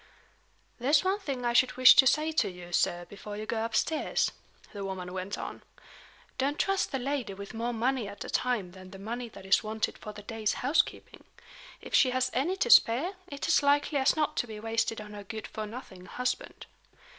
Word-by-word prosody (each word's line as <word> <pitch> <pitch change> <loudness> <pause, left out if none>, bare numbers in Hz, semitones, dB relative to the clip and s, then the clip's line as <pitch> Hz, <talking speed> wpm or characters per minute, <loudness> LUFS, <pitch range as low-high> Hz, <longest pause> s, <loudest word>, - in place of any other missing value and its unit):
"There's 285 +5 +3
one 380 +2 +1
thing 270 -10 -4
I 240 - +1
should 250 +1 +3
wish 255 -2 +9
to 265 - +8
say 305 +4 +2
to 315 - +1
you, 180 -1 -11
sir, 175 -1 +1
before 205 +2 -9
you 215 - -5
go 225 0 -2
upstairs," 230 +7 0 0.4
the 200 -1 -5
woman 185 -2 -5
went 185 +2 -4
on. - - -6 0.8
"Don't 280 +3 0
trust 390 -1 0
the 270 - -1
lady 260 -6 -3
with 200 0 -9
more 230 +2 -2
money 240 0 0
at 200 0 -8
a - - -7
time 230 -8 0
than 185 0 -12
the 195 - -10
money 235 +4 -5
that 195 -3 -13
is 190 +3 +4
wanted 220 0 -3
for 210 - -7
the 210 0 -11
day's 220 0 -1
housekeeping. 285 +5 0 0.6
If - - -11
she 260 - +5
has 255 0 0
any 300 +9 0
to 240 -10 +1
spare, 270 +12 +6
it's 285 -3 -5
as - - +4
likely 285 +1 +2
as 265 - +3
not 305 -1 0
to 245 - 0
be 215 -1 -8
wasted 225 0 -1
on 210 0 -9
her 205 -1 -8
good 220 +2 -7
for 215 -1 -6
nothing 195 -5 -10
husband." 250 0 -3
230 Hz, 205 wpm, -29 LUFS, 205-270 Hz, 0.8 s, wish